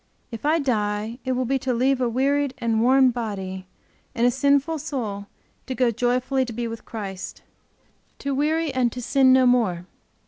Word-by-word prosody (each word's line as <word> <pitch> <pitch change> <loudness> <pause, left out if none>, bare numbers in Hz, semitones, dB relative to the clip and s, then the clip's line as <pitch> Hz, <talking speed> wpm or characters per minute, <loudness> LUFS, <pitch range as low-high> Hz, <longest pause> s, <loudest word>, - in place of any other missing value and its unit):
If 230 +5 -4
I 315 +2 +4
die 220 -4 -1
it 260 - 0
will 255 0 -1
be 270 +2 0
to 255 -1 -1
leave 260 +2 +2
a 245 - +1
wearied 275 +2 0
and 230 -3 0
worn 260 +1 +5
body, 190 -5 -5 0.5
and 235 - +2
a 245 - +4
sinful 280 +4 +1
soul 210 -8 -4 0.4
to 260 - -3
go 250 -2 +2
joyfully 250 +3 0
to 240 - -7
be 235 +1 -3
with 230 0 -8
Christ, 195 -4 -7 0.7
to 280 0 -3
weary 305 +2 0
and 250 -2 +1
to 250 - -6
sin 260 +2 +3
no 260 0 +5
more. 220 -9 +2
250 Hz, 180 wpm, -23 LUFS, 225-270 Hz, 0.7 s, worn